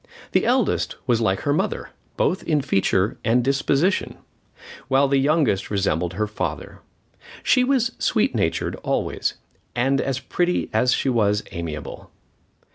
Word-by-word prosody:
The - - +2
eldest - - +1
was 120 -2 +2
like 95 -3 +1
her 145 - +1
mother, - - -2 0.3
both 185 - +1
in 155 -3 +1
feature 105 -3 +1
and 120 +2 +2
disposition, 140 +7 +1 0.7
while 135 +1 +3
the 135 0 +2
youngest 145 - +1
resembled 90 -4 0
her 105 +3 -1
father. 95 -8 -5 0.6
She 255 - +4
was 260 -2 +2
sweet - - +1
natured - - 0
always, - - -2 0.4
and 135 +3 +2
as 135 -2 -2
pretty 175 +7 -1
as 125 +3 +3
she 135 - +1
was 105 -4 +2
amiable. 80 -3 -6
125 Hz, 135 wpm, -23 LUFS, 100-145 Hz, 0.7 s, She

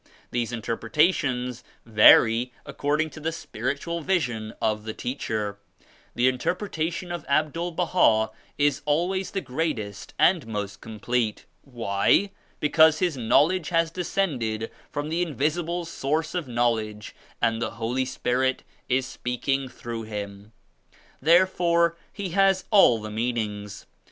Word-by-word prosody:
These 120 -1 -1
interpreta; 120 - +1
tions 125 -5 -3 0.2
vary 115 +2 +6
according 150 +2 -1
to - - -10
the 160 +2 -2
spiritual 165 +3 -4
vision 120 - -1
of 110 -1 0
the 110 0 -6
teacher. 110 -5 -3 0.6
The 125 - +3
interpretation 175 +5 -2
of 175 -3 -4
Abdul 155 +4 0
Baha 115 -11 +3 0.3
is 145 0 +2
always 180 +6 0
the 195 - -3
greatest 125 -8 -4
and 170 -9 +3
most 105 -2 -5
complete. 110 0 -2 0.2
Why? 120 - +1 0.3
Because 160 +1 +5
his 175 -4 0
Knowledge 150 +9 +2
has 165 -2 +1
descended 135 - -2 0.2
from 145 +1 -4
the 165 - -1
103 165 -4 -5
Invisible 170 +5 -1
Source 160 0 -2
of 175 -6 -3
Knowledge 115 -3 -1 0.2
and 115 -1 +1
the - - -2
Holy 120 +3 -1
Spirit 130 +1 0 0.3
is 130 +1 +2
speaking 130 +2 -2
through 120 -2 -6
him. 100 -1 -7 0.7
Therefore 170 +1 +3 0.2
he 200 -3 -5
has 195 +1 +3
all 190 - +6
the 105 0 -7
meanings. 105 -3 -3
130 Hz, 125 wpm, -25 LUFS, 115-165 Hz, 0.7 s, vary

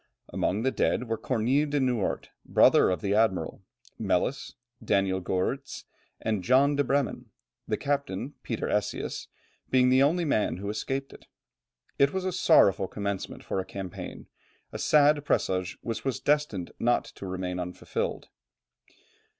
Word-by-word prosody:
Among 105 +4 -1
the 130 - +2
dead 125 - 0
were 115 - 0
Cornille 130 +6 +1
de 145 0 +1
Noort, 125 -6 -1
brother - - +5
of 90 -4 -1
the 100 - 0
admiral, 110 -3 +1 0.4
Melis, - - -1 0.3
Daniel 95 -1 +1
Goerrits, 95 +10 -2 0.4
and 110 -4 -1
John 135 +7 +4
de 145 - +2
Bremen 140 0 -1 0.4
the - - 0
captain, 140 -3 -2
Peter 115 - -3
Esias, 105 -1 -2 0.4
being 125 -1 +4
the 130 +1 +5
only 165 +5 +3
man 110 - +1
who 100 +2 -5
escaped. 135 +5 -5 0.7
It 140 0 +4
was 190 -1 -2
a 185 - 0
sorrowful 130 - +4
commencement 100 -1 -4
for - - -2
a - - -1
campaign, 95 -2 -7 0.5
a - - -6
sad 150 -1 +4
presage 95 -7 0
which 115 -1 -4
was 135 -3 -1
destined 145 -12 0
not 120 +1 +2
to 100 - -9
remain 90 -1 -3
unfulfilled. 90 0 -4
115 Hz, 140 wpm, -28 LUFS, 95-140 Hz, 0.7 s, brother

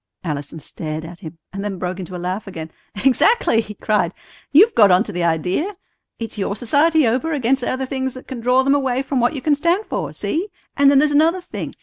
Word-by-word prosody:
Allison 150 -2 -4
stared 155 +1 -6
at 170 +1 -10
him, 165 -4 -10 0.2
and 195 0 -4
then 205 -2 -3
broke 180 +1 -4
into 185 0 -7
a - - -3
laugh 185 +4 -4
again. 160 -4 -7 0.3
"Exactly," 270 - +4
he 210 -1 -9
cried; 200 -6 0 0.4
"you've 405 +10 +6
got 210 -3 +6
onto 185 +4 +2
the 175 0 -2
idea. 180 - 0 0.4
It's 225 -2 -6
your 200 +1 -1
society 290 +7 +3
over 260 +8 0
against 265 -1 +1
the - - -2
other 260 +1 -2
things 265 -1 -3
that 255 - -11
can 260 - -6
draw 250 +3 +3
them 275 +1 +3
away 265 -2 0
from 270 -1 -1
what 240 +5 +2
you 290 +2 +1
stand 345 +8 +1
for. - - -3
See? 345 +6 -2 0.3
And 280 0 +5
then 280 - +5
there's 295 +2 +4
another 320 +5 +3
thing. 355 - -7
245 Hz, 220 wpm, -20 LUFS, 185-285 Hz, 0.4 s, you've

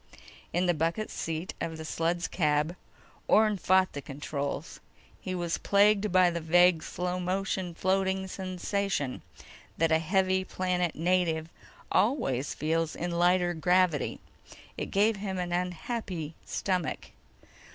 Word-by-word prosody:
In 180 +2 +1
the 175 - +3
bucket 165 +7 -1
seat 165 +2 -4
of 160 -1 -3
the 160 - -7
sled's 170 +2 -1
cab, 150 0 +1 0.5
Orne 215 -1 +4
fought 185 0 +3
the 145 - -5
controls. 140 +3 -5 0.4
He 185 -1 -4
was 175 -2 -2
plagued 205 0 +3
by 185 -1 +5
the 170 0 -3
vague 175 +1 +5
slow 180 +2 -3
motion 185 -1 -2
floating 190 +1 0
sensation 185 -5 -2 0.6
that 165 0 +2
a 160 - +5
heavy 190 +3 +1
planet 180 -2 -1
native 165 -1 +1 0.4
always 145 - +1
feels 160 +1 -1
in 175 +1 -3
lighter 175 +1 +3
gravity. 180 -2 +2 0.6
It - - -4
gave 210 +2 +2
him 195 -1 -4
an 180 -1 -3
unhappy 180 -2 -3
stomach. 185 -4 -2
180 Hz, 130 wpm, -29 LUFS, 165-190 Hz, 0.6 s, by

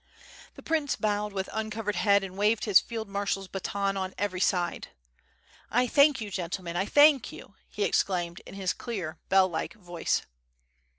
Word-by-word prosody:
The - - -12
prince 310 -3 0
bowed 210 -1 -1
with 195 -1 -3
uncovered 215 -1 -3
head 200 +2 +4
and 190 -1 -7
waved 210 +2 +1
his 205 -4 +7
field 225 -2 -6
marshaFs 195 -1 -3
baton 195 +1 -2
on 190 -1 -4
every 190 -2 -2
side. 180 -2 0 0.8
"1 245 +1 +2
thank 285 0 +5
you, 210 -2 -6
gentlemen, 175 -1 -4
I 190 +3 0
thank 290 -1 +5
you!" - - -12 0.2
he 205 - -3
exclaimed 175 -3 0
in - - -10
his 190 -2 -1
clear, 180 -9 -5
bell 190 -1 +5
like 170 +6 -4
voice. 175 -5 -2
200 Hz, 165 wpm, -28 LUFS, 185-220 Hz, 0.8 s, his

